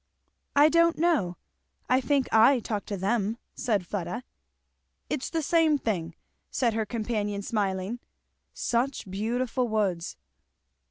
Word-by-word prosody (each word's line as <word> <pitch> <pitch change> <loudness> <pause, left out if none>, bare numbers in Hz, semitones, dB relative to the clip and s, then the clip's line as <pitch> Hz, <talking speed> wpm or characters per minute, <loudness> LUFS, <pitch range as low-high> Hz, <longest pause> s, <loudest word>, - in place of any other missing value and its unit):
"I 290 +1 +7
don't 335 +1 +4
know 300 - +1 0.5
I 255 +1 +3
think 270 +1 +1
I 230 +4 +6
talk 210 -3 -4
to 205 - -3
them," 210 +3 0 0.2
said 210 -7 0
Fleda. 180 +4 -4 0.9
"It's 285 -3 -2
the 325 -2 -1
same 320 -1 +3
thing," 170 - -2 0.3
said 235 -3 +1
her 220 -1 -1
companion 210 -2 -2
smiling. 200 +1 -1 0.5
"Such 245 0 -1
beautiful 240 +5 -1
woods!" 200 -6 -1
225 Hz, 120 wpm, -27 LUFS, 200-260 Hz, 0.9 s, I